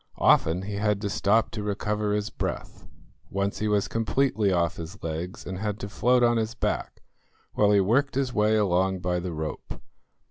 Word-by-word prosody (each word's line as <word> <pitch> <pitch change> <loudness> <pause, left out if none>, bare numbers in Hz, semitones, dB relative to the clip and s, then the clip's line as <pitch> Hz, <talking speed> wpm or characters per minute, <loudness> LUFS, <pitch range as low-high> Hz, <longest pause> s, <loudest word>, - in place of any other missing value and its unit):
Often 85 +4 +3
he 100 +1 -4
had 105 -1 +1
to 100 -1 -2
stop 110 +4 +2
to 110 - -4
recover 105 +1 -1
his 105 0 -1
breath. - - -5 0.4
Once 100 +1 -2
he 110 - -1
was 105 -1 +1
completely 115 -2 +1
off 85 -2 +1
his 85 +4 -8
legs 85 +3 -5
and 95 -1 -5
had 105 -1 -3
to 100 - -5
float 125 +4 +2
on 120 0 +4
his 110 +1 -2
back, - - -3 0.5
while 105 -1 +3
he 100 -1 +5
worked 125 +9 +1
his 135 -2 0
way 105 0 +3
along 95 -2 +1
by 90 0 0
the 90 0 -4
rope. 80 -1 -6
105 Hz, 185 wpm, -26 LUFS, 95-110 Hz, 0.5 s, he